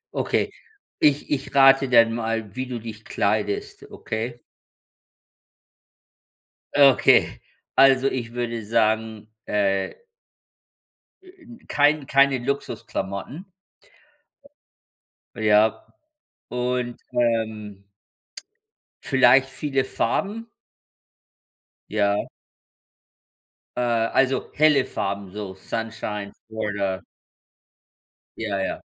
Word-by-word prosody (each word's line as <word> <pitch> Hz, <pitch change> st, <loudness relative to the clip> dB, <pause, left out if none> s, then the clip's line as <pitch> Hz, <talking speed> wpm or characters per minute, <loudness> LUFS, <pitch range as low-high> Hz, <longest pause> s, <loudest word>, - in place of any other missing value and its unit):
Okay. -, -, 0 dB, 0.5 s
Ich 145 Hz, -1 st, +2 dB
ich 140 Hz, -1 st, -2 dB
rate 135 Hz, -1 st, +6 dB
dann 115 Hz, -2 st, +5 dB
mal, 115 Hz, -3 st, -3 dB
wie 130 Hz, 0 st, -3 dB
du 125 Hz, -2 st, -5 dB
dich 110 Hz, -1 st, -9 dB
kleidest, 105 Hz, 0 st, -2 dB
okay? 120 Hz, +2 st, -5 dB, 2.4 s
Okay. 140 Hz, -2 st, +5 dB, 0.4 s
Also, 135 Hz, 0 st, +6 dB
ich 120 Hz, -4 st, -3 dB
würde 120 Hz, -2 st, -3 dB
sagen, 110 Hz, -1 st, 0 dB, 0.2 s
äh 100 Hz, -2 st, 0 dB, 1.3 s
äh 370 Hz, -2 st, -18 dB
n 240 Hz, -4 st, -15 dB
kein 145 Hz, 0 st, +2 dB
keine 135 Hz, -1 st, +4 dB
Luxusklamotten. 135 Hz, -, -4 dB, 1.9 s
Ja. 110 Hz, -1 st, +2 dB, 0.6 s
Und, 125 Hz, 0 st, -2 dB
ähm 110 Hz, -4 st, -2 dB, 1.2 s
vielleicht 130 Hz, 0 st, +5 dB
viele 135 Hz, 0 st, -1 dB
Farben? 205 Hz, -, -2 dB, 1.4 s
Ja. 100 Hz, -1 st, +1 dB, 1.5 s
Äh, 125 Hz, -, 0 dB
also, 120 Hz, +3 st, +1 dB
helle 150 Hz, -3 st, +4 dB
Farben, 100 Hz, -1 st, -4 dB
so 100 Hz, -2 st, -7 dB
Sunshine 105 Hz, 0 st, -5 dB, 0.2 s
oder 100 Hz, -4 st, -3 dB, 1.3 s
ja, 105 Hz, -3 st, -3 dB
ja. 95 Hz, -, -3 dB
115 Hz, 80 wpm, -23 LUFS, 105-135 Hz, 2.4 s, rate